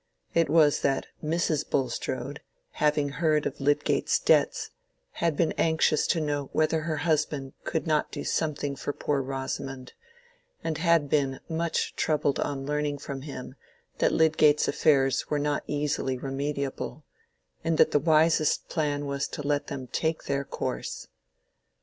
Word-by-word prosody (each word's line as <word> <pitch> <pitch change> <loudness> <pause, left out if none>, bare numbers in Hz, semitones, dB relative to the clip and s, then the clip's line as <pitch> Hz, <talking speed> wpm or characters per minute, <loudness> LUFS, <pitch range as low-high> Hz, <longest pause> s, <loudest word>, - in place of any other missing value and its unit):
It 165 -1 +3
was 155 -3 +4
that 135 -1 +1 0.2
Mrs. 160 -1 0
Bulstrode, 130 +1 -2 0.3
having 150 -1 +1
heard 150 0 +1
of 145 +1 -4
Lydgate's 145 +1 +2
debts, - - +2 0.5
had 165 -3 +1
been 165 - +2
anxious 160 -2 +3
to 165 - +2
know 145 -3 -2
whether 155 0 +2
her 155 0 -2
husband 150 -4 0
could 160 0 -1
not 155 -2 +1
do - - -5
something 145 -3 -1
for 145 - -4
poor 140 -1 -1
Rosamond, 135 0 -5 0.7
and 160 -1 -2
had 165 -3 +3
been 135 -2 +1
much 165 +1 -1
troubled 150 -3 +1
on 135 -1 -2
learning 150 0 -1
from 140 -1 -6
him 130 -3 -7 0.5
that - - +3
Lydgate's 155 -2 +4
affairs 135 -3 +2
were 150 - +1
not 145 0 0
easily 145 -3 -1
remediable, 140 +1 -3 0.6
and 165 -1 +1
that - - +5
the 145 - +4
wisest 155 0 +3
plan 145 -2 -1
was 140 0 -2
to 145 - -6
let 145 0 0
them 135 -2 -5
"take 160 +5 -1
their 140 0 -1
course." - - -4
145 Hz, 145 wpm, -27 LUFS, 140-155 Hz, 0.7 s, that